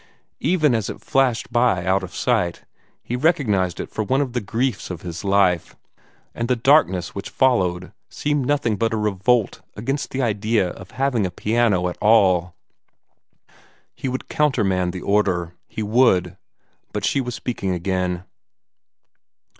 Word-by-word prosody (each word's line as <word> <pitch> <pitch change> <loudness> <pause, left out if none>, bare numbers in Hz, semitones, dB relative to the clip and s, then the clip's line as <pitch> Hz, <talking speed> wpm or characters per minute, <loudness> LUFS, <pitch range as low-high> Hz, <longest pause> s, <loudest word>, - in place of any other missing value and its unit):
Even 155 -7 +2
as 110 -3 -1
it - - -6
flashed 125 -4 0
by 120 -8 +2
out 95 +2 +2
of 95 -1 -8
sight, 85 -1 0 0.4
he 120 - -3
recognized 125 - +1
it - - -5
for 110 - -2
one 130 +6 +1
of 135 -4 -1
the 125 - -1
griefs 115 +2 -2
of 90 -3 -7
his 85 -2 -6
life; 95 -4 +2 0.6
and 115 - -3
the 125 - +2
darkness 115 - +3
which 100 - -6
followed 90 -9 +1 0.2
seemed 145 -3 -1
nothing 135 -7 +1
but 115 +3 0
a - - -1
revolt 105 +2 +1
against 135 +7 -3
the 130 - -4
idea 110 -4 +1
of 95 +1 -10
having 130 -3 0
a 95 - 0
piano 105 -1 +1
at 90 - -5
all. 95 -5 +4 1.4
He - - -5
would 130 0 -4
countermand 95 -12 +1
the 90 0 -7
order. 95 -4 +1
He 110 - -5
would 105 -6 +3 0.6
but 105 -1 -2
she 140 - +1
was 125 -2 -4
speaking 115 -6 -3
again. 90 0 -1
105 Hz, 155 wpm, -22 LUFS, 90-125 Hz, 1.4 s, all